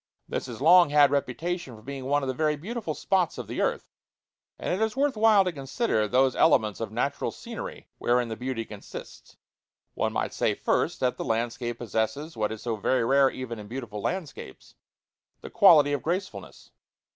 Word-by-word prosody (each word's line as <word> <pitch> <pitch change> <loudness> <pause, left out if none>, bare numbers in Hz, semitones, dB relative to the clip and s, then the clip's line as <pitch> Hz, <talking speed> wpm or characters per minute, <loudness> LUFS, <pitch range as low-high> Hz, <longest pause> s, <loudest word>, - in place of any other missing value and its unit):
This - - -4
has 120 -1 -8
long 175 +2 +7
had 145 -1 +5
reputation 140 +1 -2
for 110 - -15
being 135 +1 -7
one 145 +1 +1
of - - -2
the 130 - -1
very 155 +2 +1
beautiful 190 0 -5
spots 175 +3 0
of - - -5
the - - -4
earth, - - -1 0.7
and - - -2
it 195 +4 0
is 220 +3 -2
worth 280 -1 +1
while 215 -2 +5
to 180 - -1
consider 135 - -1
those 130 +3 +2
elements 110 -10 +3
of 110 -2 -4
natural 125 +5 -1
scenery - - -8
wherein 120 0 +1
the 110 - -4
beauty 125 -1 -4
consists. 105 -2 -11 0.6
One - - -1
might - - -2
say, - - 0
first, - - 0
that 125 -1 +1
the - - -3
landscape 120 +1 -2
possesses 120 +7 -3
what 110 -1 -1
is 110 - -7
so 115 -2 -2
very 120 +3 +1
rare 135 +2 +4
even 120 -4 -6
in 105 - -9
beautiful 115 -3 -6
landscapes 175 - -6 0.7
the - - -9
quality 160 -9 +6
of 140 - -1
gracefulness. 185 +6 -5
135 Hz, 185 wpm, -27 LUFS, 115-165 Hz, 0.7 s, long